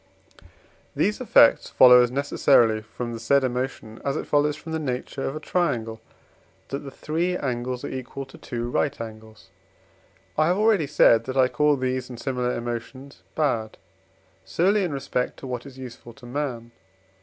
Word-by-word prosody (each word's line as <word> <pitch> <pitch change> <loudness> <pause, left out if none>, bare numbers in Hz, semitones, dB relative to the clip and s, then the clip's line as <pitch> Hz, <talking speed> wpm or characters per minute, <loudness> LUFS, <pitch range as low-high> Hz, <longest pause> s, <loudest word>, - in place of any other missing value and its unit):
These 210 +5 0
effects 200 - +5
follow 125 -1 +8
as 120 - +2
necessarily 125 -4 +3
from 120 +2 -6
the 115 - -6
said 140 +4 +2
emotion, 125 -3 -4
as 140 - -1
it - - -4
follows 145 0 +2
from 160 +1 -9
the 160 - -1
nature 135 -1 -4
of 135 - -3
a - - -4
triangle, 120 -11 -1 0.7
that 140 - -3
the 140 - -9
three 170 +6 -2
angles 125 -2 -3
are - - -3
equal 130 +1 -6
to 135 - -15
two 120 -1 -4
right 145 +2 0
angles. 110 -1 -10 0.9
I 155 - +4
have 180 +2 +2
already 210 -7 +3
said 115 -3 +4
that 130 +1 -4
I 130 -1 +5
call 150 +1 +2
these 130 -1 -2
and 120 -2 -9
similar 125 -1 -2
emotions 120 +4 -6
bad, 115 -8 -1 0.7
solely 195 +4 +1
in 175 - -2
respect 135 -2 -2
to - - -10
what 125 0 -5
is 135 -1 -13
useful 125 -2 -10
to 125 +1 -15
man. 120 -3 -4
130 Hz, 170 wpm, -24 LUFS, 120-145 Hz, 0.9 s, follow